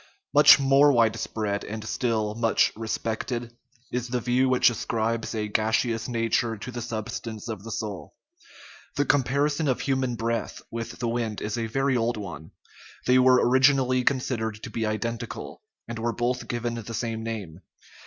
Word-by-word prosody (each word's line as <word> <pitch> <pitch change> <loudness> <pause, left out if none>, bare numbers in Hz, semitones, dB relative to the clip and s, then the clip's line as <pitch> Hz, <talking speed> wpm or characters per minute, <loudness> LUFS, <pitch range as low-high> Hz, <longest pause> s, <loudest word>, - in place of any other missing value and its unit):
Much - - +9
more 140 +1 +5
widespread, 110 -3 0
and 110 +1 -6
still 110 -2 0
much 115 0 +2
respected, 115 +2 -3 0.4
is 125 0 -2
the 125 0 -1
view 125 +2 +2
which 125 -1 +5
ascribes 115 0 -2
a 105 -1 -1
gaseous 110 +2 0
nature 115 -1 0
to 115 +5 -7
the 120 0 -5
sub 110 -2 -4
stance 110 -1 -6
of 110 -4 -5
the 115 - -8
soul. 105 -3 -5 0.8
The 145 - +1
comparison 145 +3 +1
of 130 - 0
human 130 -3 0
breath 115 -1 -2
with 115 0 -5
the 120 - -2
wind 115 -2 -2
is 105 0 -3
a 115 -1 -2
very 135 +3 +1
old 120 -1 0
one; 85 -6 -7 0.6
they 125 0 +5
were 130 -1 +5
originally 130 0 +4
considered 115 -5 -1
to - - -6
be 110 -1 -1
identical, 115 +2 -4 0.3
and 115 0 -5
were 115 +1 -1
both 120 +3 -1
given 120 0 -2
the 115 -1 -6
same 115 -1 -3
name. 105 -8 -5
115 Hz, 165 wpm, -26 LUFS, 110-125 Hz, 0.8 s, Much